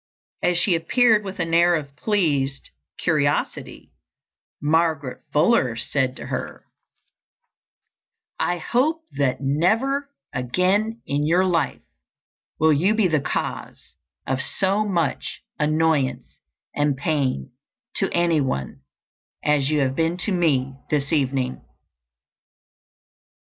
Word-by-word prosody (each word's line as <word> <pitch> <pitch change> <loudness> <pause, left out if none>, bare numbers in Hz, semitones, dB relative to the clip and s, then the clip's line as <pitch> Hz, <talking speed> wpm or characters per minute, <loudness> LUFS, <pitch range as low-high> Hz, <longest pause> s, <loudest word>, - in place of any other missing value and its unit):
As 180 -1 +2
she 180 +1 +3
appeared 215 +6 +3
with 195 -1 -7
an 165 -2 -2
air 170 +1 +5
of 140 -3 -5
pleased 150 -7 0 0.3
curiosity, 145 -4 -1 0.7
Margaret 155 -3 0
Fuller 150 - +3
said 130 +2 0
to - - -7
her, - - -5 1.7
"I 175 - 0
hope 305 - 0
that 140 -2 0
never 225 - +1 0.2
again 190 - 0
in 145 +1 -1
your 180 +4 +3
life 165 -6 0 0.7
will 160 0 +4
you 185 +9 +2
be 215 -4 +3
the 155 -4 +1
cause - - -4 0.3
of 135 0 -1
so 195 +7 0
much 170 -8 -2 0.2
annoyance 155 -3 0 0.3
and 145 -2 +1
pain 135 - -1 0.5
to 195 - +1
any 170 -3 +2
one 65 - -3 0.6
as 145 -2 +2
you 150 -1 +2
have 135 -1 0
been 165 +2 0
to 210 - -1
me 135 -7 +1
this 145 0 0
evening." 135 -3 0
160 Hz, 110 wpm, -23 LUFS, 140-185 Hz, 1.7 s, air